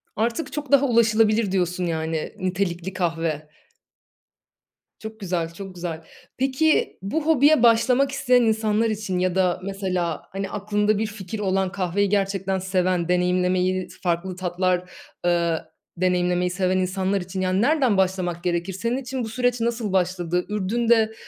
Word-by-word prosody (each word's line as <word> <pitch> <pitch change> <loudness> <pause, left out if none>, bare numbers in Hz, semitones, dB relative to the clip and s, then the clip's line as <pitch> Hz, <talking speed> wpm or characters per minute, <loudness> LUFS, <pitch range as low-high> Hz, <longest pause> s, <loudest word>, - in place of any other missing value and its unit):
"Artık 230 +8 -2
çok 295 -3 -5
daha 280 0 +6
ulaşılabilir." 225 -3 +3
diyorsun, 180 -1 0
yani, 160 +2 -3
nitelikli 185 -1 -2
kahve. 165 -4 -2 1.5
Çok 220 0 -9
güzel, 170 -4 -2
çok 190 0 -9
güzel. 170 -2 -5 0.3
Peki, 270 +4 +1
bu 290 +11 -2
hobiye 300 -3 +4
başlamak 250 +4 +4
isteyen 250 -2 +3
insanlar 220 0 +1
için 205 -4 -2
ya 185 0 0
da 180 -2 +2
mesela, 185 -4 -2
hani, 195 0 -4
aklında 210 +1 0
bir 220 +1 -1
fikir 210 0 -7
olan, 190 -1 0
kahveyi 195 +1 0
gerçekten 195 -1 0
seven, 185 -2 0
deneyimlemeyi, 180 +1 +1 0.2
farklı 175 +1 -1
tatlar, 180 0 -1 0.3
eee, 170 -2 +2 0.4
deneyimlemeyi 180 0 +1
seven 185 0 0
insanlar 190 +1 0
için, 185 +1 -5
yani, 185 +2 +1
nereden 265 -6 +3
başlamak 185 -2 0
gerekir? 175 +1 -1
Senin 230 +6 -2
için 260 -1 -4
bu 220 - -4
süreç 245 +1 0
nasıl 230 -4 -1
başladı? 180 -1 0
Ürdün'de, 220 +2 +1
190 Hz, 140 wpm, -23 LUFS, 180-220 Hz, 1.5 s, daha